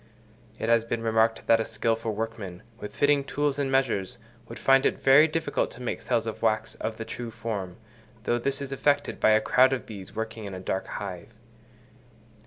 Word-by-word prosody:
It - - -3
has 115 -1 +4
been 115 0 -3
remarked 115 0 +2
that 115 - +5
a - - +1
skilful 115 -1 -1
workman, 110 -4 -5 0.2
with 105 - -8
fitting 145 -1 +3
tools 145 0 -1
and 135 -2 0
measures, 125 -5 0 0.3
would 115 - -7
find 135 0 +4
it - - +1
very 140 +4 +6
difficult 160 -2 -1
to 120 - -12
make 125 - -3
cells 115 -1 0
of 110 - -5
wax 110 -1 +1
of 110 0 -5
the 115 - -5
true 120 0 -6
form, 110 -5 -5 0.5
though 120 - +1
this 140 +3 -2
is 135 - -7
effected 145 +1 +1
by - - +4
a 110 0 +6
crowd 130 +4 +4
of 125 - -3
bees 100 -3 -9
working 110 0 -4
in 100 -1 -6
a - - -6
dark 95 +1 -3
hive. 100 +2 -7
115 Hz, 195 wpm, -27 LUFS, 110-135 Hz, 0.5 s, very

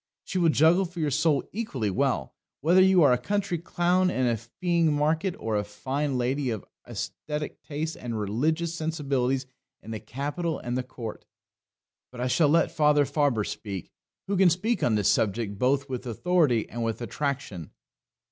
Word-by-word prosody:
She 185 - -2
will 170 -2 +4
juggle 165 +5 +4
for 175 0 -8
your 150 -2 0
soul 150 0 +2
equally 135 - -2
well 95 - 0 0.3
whether 175 +5 +5
you 190 -2 +6
are 140 - +6
a 125 - +1
country 200 +3 -1
clown 180 +2 +2
in 130 -7 0
a 120 -1 +2
feeing 165 - 0
market 160 +5 +1
or 110 -1 -2
a 105 - +1
fine 135 +7 -2
lady 130 +2 0
of 110 -4 -4 0.2
aesthetic 150 -1 -5
tastes 155 +2 -4
and 115 -3 -4
religious 155 +11 0
sensibilities 140 -5 -1 0.4
in 110 - -8
the 110 - -4
capital 145 - -3
and 120 0 -4
the 130 - 0
court. 125 -3 -8 0.9
But 125 - -10
I 125 - -1
shall 145 +4 +3
let 165 +2 +3
Father 150 -1 +4
Faber 140 -7 +1
speak, 100 -3 -6 0.3
who 200 - -1
can 185 -1 +6
speak 210 +8 0
on 115 - +2
this 105 -2 +2
subject 100 -1 +1
both 140 +2 +2
with 130 -1 -5
authority 135 - +2
and 120 +1 -4
with 115 -1 -2
attraction. 125 - -3
140 Hz, 175 wpm, -27 LUFS, 120-165 Hz, 0.9 s, you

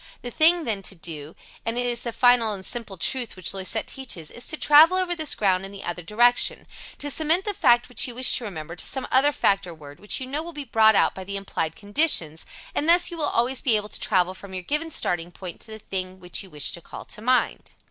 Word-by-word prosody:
The 245 - -5
thing, 330 +5 +4
then, 215 -7 -2
to 195 - -5
do 160 -3 -8 0.3
and 230 +1 -3
it 245 - 0
is 240 -1 0
the 235 - -4
final 240 -2 +4
and 190 -2 -8
simple 225 -5 -4
truth 245 +6 -1
which 185 0 -1
Loisette 195 +3 -2
teaches 230 - -5
is 240 - -7
to 310 - -4
travel 315 +6 +6
over 365 -2 -1
this 315 -3 -2
ground 190 -3 +1
in 195 - -6
the 200 -1 -10
other 175 +1 -4
direction 240 +7 +2 0.3
to 290 0 -2
cement 320 +6 +2
the 415 - -2
fact 245 -12 +3
which 250 - 0
you 245 - -7
wish 255 +1 +5
to - - -5
remember 170 -5 -7
to - - -3
some 265 - -1
other 275 +3 +4
fact 195 -8 +1
or 170 - -9
word 145 -2 -13
which 210 - 0
you 260 - -5
know 280 +4 -3
will 340 +1 -9
be 295 -1 -6
brought 220 -3 +4
out - - +3
by 190 - -8
the 200 +1 -5
implied 165 -5 -4
conditions 205 - +1 0.3
and 305 - 0
thus 350 +1 +4
you 340 - -7
will 300 - +1
always 245 +3 0
be 245 -6 +3
able 210 0 -2
to - - -4
travel 185 -2 +1
from 190 0 -10
your 185 - -5
given 300 - -1
starting 175 - -2
point 180 -1 -9
to - - -10
the 220 - -8
thing 185 -2 -5
which 180 -1 -4
you 190 - -11
wish 150 -4 +1
to 170 - -6
call - - -10
to 210 - -9
mind. 255 +2 0
220 Hz, 255 wpm, -24 LUFS, 185-265 Hz, 0.3 s, travel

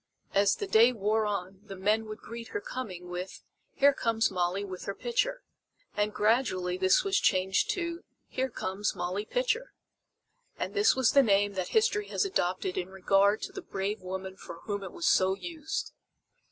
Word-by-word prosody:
As 200 0 +4
the 410 - -4
day 235 - +6
wore 215 -1 0
on 190 -2 -4
the 200 -2 -9
men 210 +4 +1
would 215 0 -6
greet 230 +1 -8
her 415 - -3
coming 195 - -6
with: 180 +1 -6 0.3
"Here 280 +1 +5
comes 225 -4 +1
Molly 185 +2 -1
with 185 -2 -7
her 200 - -3
pitcher!" - - -1 0.5
And 210 0 +1
gradually 210 -5 +1
this 185 0 +3
was 395 +1 +2
changed 190 - +2
to 340 -1 -4 0.2
"Here 260 +1 -2
comes 200 -3 -2
Molly 185 +4 -3
Pitcher." - - -1 0.8
And - - -3
this 410 +1 +4
was 260 -3 +3
the 280 - +6
name 205 -4 +3
that 185 -2 -2
history 435 -2 +2
has - - 0
adopted 185 - -1
in 180 0 -4
regard 195 +2 +2
to - - -4
the - - -7
brave 195 +2 -3
woman 190 +1 -6
for 165 - -10
whom 205 -2 -3
it 190 - -7
was 170 - -5
so 190 0 +4
used. 315 - -5
205 Hz, 180 wpm, -29 LUFS, 190-255 Hz, 0.8 s, day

